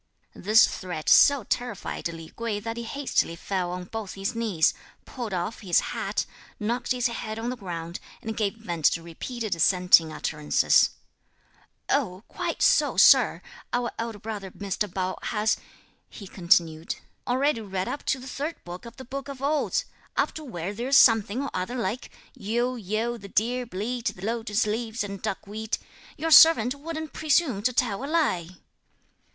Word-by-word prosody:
This 215 Hz, +3 st, +5 dB
threat 175 Hz, -4 st, -6 dB
so 280 Hz, -4 st, +6 dB
terrified 240 Hz, -3 st, -3 dB
Li 165 Hz, -1 st, -9 dB
Kuei 230 Hz, -3 st, -2 dB
that 225 Hz, +2 st, -5 dB
he 235 Hz, -, -4 dB
hastily 245 Hz, -7 st, -1 dB
fell 180 Hz, 0 st, -2 dB
on 180 Hz, 0 st, -4 dB
both 210 Hz, +1 st, -6 dB
his 195 Hz, +3 st, -2 dB
knees, 215 Hz, -9 st, +2 dB, 0.3 s
pulled 240 Hz, -5 st, -6 dB
off 185 Hz, +4 st, -3 dB
his 185 Hz, -5 st, +3 dB
hat, -, -, -2 dB, 0.3 s
knocked 235 Hz, +4 st, -2 dB
his 250 Hz, -1 st, 0 dB
head 225 Hz, -3 st, -2 dB
on 235 Hz, +2 st, -2 dB
the -, -, -4 dB
ground, 170 Hz, -5 st, -6 dB, 0.2 s
and 220 Hz, 0 st, -4 dB
gave 210 Hz, -1 st, -1 dB
vent 175 Hz, -8 st, -5 dB
to 165 Hz, -, +3 dB
repeated 215 Hz, +6 st, -4 dB
assenting 170 Hz, -1 st, +5 dB
utterances: 150 Hz, -1 st, +2 dB, 1.0 s
"Oh, 210 Hz, -9 st, 0 dB
quite -, -, -3 dB
so, -, -, +4 dB
Sir! -, -, +6 dB, 0.3 s
Our 245 Hz, -1 st, 0 dB
elder 230 Hz, -2 st, -3 dB
brother 205 Hz, -2 st, -6 dB
Mr. 200 Hz, +1 st, -3 dB
Pao 185 Hz, 0 st, -2 dB
has," 215 Hz, 0 st, 0 dB, 0.5 s
he 205 Hz, -, -10 dB
continued, 170 Hz, -3 st, +1 dB, 0.3 s
"already 260 Hz, 0 st, +1 dB
read 190 Hz, -3 st, -3 dB
up 290 Hz, -, -4 dB
to -, -, +1 dB
the 255 Hz, -, -10 dB
third 290 Hz, +5 st, -4 dB
book 175 Hz, +5 st, -8 dB
of 235 Hz, -, -12 dB
the 260 Hz, -, -9 dB
Book 275 Hz, +3 st, -6 dB
of 275 Hz, -2 st, -7 dB
Odes, 290 Hz, +2 st, 0 dB, 0.3 s
up -, -, +2 dB
to 315 Hz, -, -7 dB
where 195 Hz, -, -5 dB
there's 250 Hz, +6 st, +2 dB
something 225 Hz, +1 st, +5 dB
or 280 Hz, -, -4 dB
other 185 Hz, +7 st, -3 dB
like: 230 Hz, 0 st, -3 dB, 0.2 s
'Yiu, 240 Hz, +5 st, -1 dB
Yiu, 225 Hz, +2 st, -2 dB
the 200 Hz, -, -9 dB
deer 240 Hz, +5 st, 0 dB
bleat; 230 Hz, +4 st, -3 dB
the 185 Hz, -, -8 dB
lotus 225 Hz, -1 st, 0 dB
leaves 220 Hz, +1 st, -2 dB
and 200 Hz, -1 st, -6 dB
duckweed.' 215 Hz, +3 st, -3 dB, 0.4 s
Your 325 Hz, +1 st, -2 dB
servant 265 Hz, -7 st, +8 dB
wouldn't 315 Hz, +1 st, -6 dB
presume 300 Hz, -8 st, +2 dB
to 250 Hz, +4 st, +2 dB
tell 240 Hz, -2 st, 0 dB
a -, -, -3 dB
lie!" 290 Hz, -, +1 dB
220 Hz, 165 wpm, -26 LUFS, 185-250 Hz, 1.0 s, servant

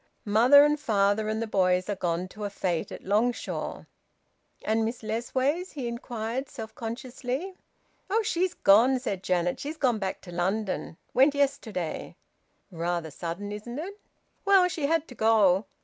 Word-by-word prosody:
Father 245 Hz, +8 st, +7 dB
and 295 Hz, 0 st, +1 dB
mother 205 Hz, 0 st, +2 dB
and 220 Hz, +1 st, -1 dB
the -, -, -2 dB
boys 185 Hz, -3 st, +2 dB
are 205 Hz, -, -1 dB
gone 175 Hz, -1 st, -2 dB
to 210 Hz, +2 st, -9 dB
a 205 Hz, -, -1 dB
fete 180 Hz, -4 st, -2 dB
at -, -, -8 dB
Longshaw." 220 Hz, +5 st, -1 dB, 0.8 s
"And 220 Hz, +1 st, +2 dB
Miss 230 Hz, +1 st, -3 dB
Lessways?" 260 Hz, +10 st, -1 dB
he 265 Hz, -5 st, -4 dB
inquired 235 Hz, +2 st, -4 dB
self 225 Hz, -5 st, -8 dB
consciously. 250 Hz, +8 st, -5 dB, 0.6 s
"Oh! 440 Hz, +3 st, +2 dB
She's 365 Hz, -2 st, 0 dB
gone," 235 Hz, +7 st, +5 dB
said 205 Hz, -7 st, -3 dB
Janet. 180 Hz, -2 st, 0 dB
"She's 305 Hz, +3 st, -5 dB
gone 245 Hz, -7 st, +1 dB
back 190 Hz, -2 st, -3 dB
to 175 Hz, -, -11 dB
London. 185 Hz, 0 st, -2 dB, 0.2 s
Went 275 Hz, +3 st, +5 dB
yesterday." 265 Hz, -, -2 dB, 0.6 s
"Rather 170 Hz, -1 st, -2 dB
sudden, 175 Hz, +7 st, -5 dB
isn't 215 Hz, +4 st, -6 dB
it?" 390 Hz, +7 st, -6 dB, 0.4 s
"Well, 390 Hz, -2 st, +5 dB
she 315 Hz, -5 st, -2 dB
had 325 Hz, 0 st, +1 dB
to -, -, -10 dB
go." 215 Hz, -4 st, +3 dB
225 Hz, 155 wpm, -27 LUFS, 195-275 Hz, 0.8 s, Father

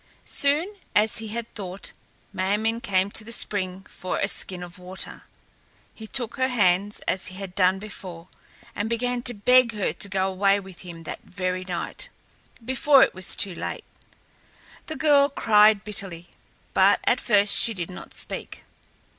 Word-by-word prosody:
Soon, 315 Hz, +9 st, +1 dB, 0.2 s
as 215 Hz, +1 st, +4 dB
he 220 Hz, -, -6 dB
had 230 Hz, +2 st, -5 dB
thought, 190 Hz, -2 st, -6 dB, 0.4 s
Ma 190 Hz, +1 st, +1 dB
min´ 225 Hz, +2 st, -1 dB
came 195 Hz, -2 st, +1 dB
to 220 Hz, -, -2 dB
the 230 Hz, -, -10 dB
spring 190 Hz, -4 st, -2 dB
for 185 Hz, -, -4 dB
a 200 Hz, -, +1 dB
skin 185 Hz, -2 st, -3 dB
of 175 Hz, 0 st, -11 dB
water. 185 Hz, +1 st, -4 dB, 0.7 s
He 220 Hz, -, -10 dB
took 240 Hz, 0 st, -3 dB
her 260 Hz, -, +2 dB
hands, 205 Hz, -4 st, +2 dB
as 190 Hz, -, -1 dB
he 185 Hz, -, -8 dB
had 190 Hz, -1 st, -7 dB
done 185 Hz, 0 st, +3 dB
before, 185 Hz, -4 st, -9 dB, 0.5 s
and 205 Hz, +2 st, -2 dB
began 245 Hz, +1 st, 0 dB
to 245 Hz, -1 st, -1 dB
beg 250 Hz, +3 st, +5 dB
her 205 Hz, -7 st, -1 dB
to 200 Hz, +3 st, -3 dB
go 190 Hz, 0 st, +1 dB
away 195 Hz, +1 st, +3 dB
with 190 Hz, -3 st, -12 dB
him 170 Hz, -2 st, -9 dB
that -, -, -7 dB
very 185 Hz, 0 st, -3 dB
night, 185 Hz, -, -3 dB, 0.6 s
before 265 Hz, +2 st, +5 dB
it -, -, +1 dB
was 185 Hz, 0 st, -1 dB
too 195 Hz, -, +1 dB
late. -, -, -5 dB, 1.0 s
The 315 Hz, -, -4 dB
girl 285 Hz, -3 st, +4 dB
cried 210 Hz, -5 st, +5 dB
bitterly, 195 Hz, -5 st, -4 dB, 0.4 s
but -, -, +5 dB
at -, -, +2 dB
first 205 Hz, -3 st, +5 dB
she 225 Hz, -, +1 dB
did 175 Hz, -1 st, -4 dB
not 180 Hz, -, -9 dB
speak. -, -, -5 dB
200 Hz, 170 wpm, -25 LUFS, 185-230 Hz, 1.0 s, beg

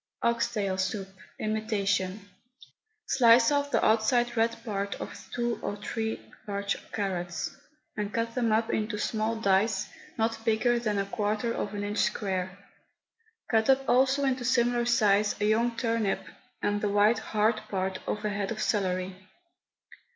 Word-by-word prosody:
OX 235 Hz, 0 st, +1 dB
TAIL 200 Hz, -4 st, -1 dB
SOUP, 190 Hz, +1 st, -2 dB, 0.3 s
IMITATION. 205 Hz, -2 st, -1 dB, 0.8 s
Slice 235 Hz, 0 st, +5 dB
off 285 Hz, 0 st, +1 dB
the -, -, +2 dB
outside 240 Hz, +2 st, +3 dB
red 230 Hz, 0 st, +1 dB
part 200 Hz, -2 st, -2 dB
of -, -, -7 dB, 0.2 s
two 240 Hz, -1 st, -1 dB
or 205 Hz, -, -3 dB
three 220 Hz, +2 st, -3 dB, 0.3 s
large 200 Hz, -1 st, -1 dB, 0.2 s
carrots, 180 Hz, -4 st, -3 dB, 0.4 s
and 210 Hz, -1 st, -3 dB
cut 230 Hz, +1 st, -1 dB
them 235 Hz, -3 st, +1 dB
up 225 Hz, +1 st, +1 dB
into 215 Hz, 0 st, -1 dB
small 220 Hz, +1 st, -1 dB
dice 200 Hz, -1 st, +2 dB, 0.3 s
not 225 Hz, 0 st, -1 dB
bigger 235 Hz, +2 st, +2 dB
than 215 Hz, -3 st, -1 dB
a 200 Hz, -, 0 dB
quarter 210 Hz, +3 st, -1 dB
of 205 Hz, -2 st, -3 dB
an 205 Hz, -, -3 dB
inch 205 Hz, +1 st, -2 dB
square. 190 Hz, -3 st, -1 dB, 0.9 s
Cut 220 Hz, 0 st, +3 dB
up 270 Hz, 0 st, +4 dB
also 265 Hz, +2 st, +3 dB
into 260 Hz, -2 st, 0 dB
similar 240 Hz, -1 st, +2 dB
size 210 Hz, -3 st, +3 dB
a 205 Hz, -, +1 dB
young 230 Hz, +2 st, +2 dB
turnip, 230 Hz, -4 st, 0 dB, 0.4 s
and 205 Hz, 0 st, +1 dB
the 210 Hz, -, +1 dB
white, 205 Hz, +3 st, +4 dB
hard 215 Hz, 0 st, +1 dB
part 190 Hz, -1 st, -2 dB
of 210 Hz, 0 st, -2 dB
a -, -, +1 dB
head 200 Hz, -1 st, -2 dB
of 225 Hz, -, -4 dB
celery. 185 Hz, -3 st, 0 dB
215 Hz, 150 wpm, -28 LUFS, 200-235 Hz, 0.9 s, Slice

